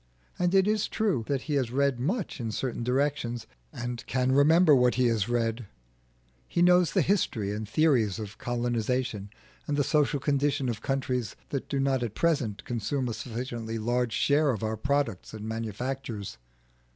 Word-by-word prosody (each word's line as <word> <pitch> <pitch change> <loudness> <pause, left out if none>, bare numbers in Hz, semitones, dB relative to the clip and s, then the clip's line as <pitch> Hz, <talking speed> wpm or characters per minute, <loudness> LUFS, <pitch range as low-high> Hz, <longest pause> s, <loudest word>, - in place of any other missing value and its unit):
And 180 +1 +2
it 190 0 +5
is 215 -1 +1
true 205 - 0
that 140 -2 -1
he 150 - -3
has 135 -4 +1
read 135 0 +1
much 185 - -2
in 115 -2 -3
certain 120 +1 -3
directions, 125 -2 -1 0.3
and 120 0 -5
can 130 0 +1
remember 155 +4 +6
what 125 -2 +4
he 130 0 +2
has 110 -1 0
read; 115 -1 -1 0.8
he 170 - +1
knows 180 -2 +5
the - - +3
history 115 - 0
and 105 0 -4
theories 120 - +2
of 105 -2 -7
colonisation 120 -3 -1 0.4
and 145 - 0
the 145 - +3
social 150 0 +2
condition 140 -1 +1
of 110 -2 -3
countries 130 -4 -2
that 140 - -4
do 140 - -1
not 135 -1 +1
at 115 -3 -3
present 140 -11 0
consume 120 +3 -2
a - - -2
sufficiently 115 0 -5
large 120 +1 0
share 145 +7 +3
of 115 -4 -1
our 110 0 -1
products 125 -4 -1
and 110 0 -6
manufactures. 115 - -4
125 Hz, 170 wpm, -28 LUFS, 115-145 Hz, 0.8 s, remember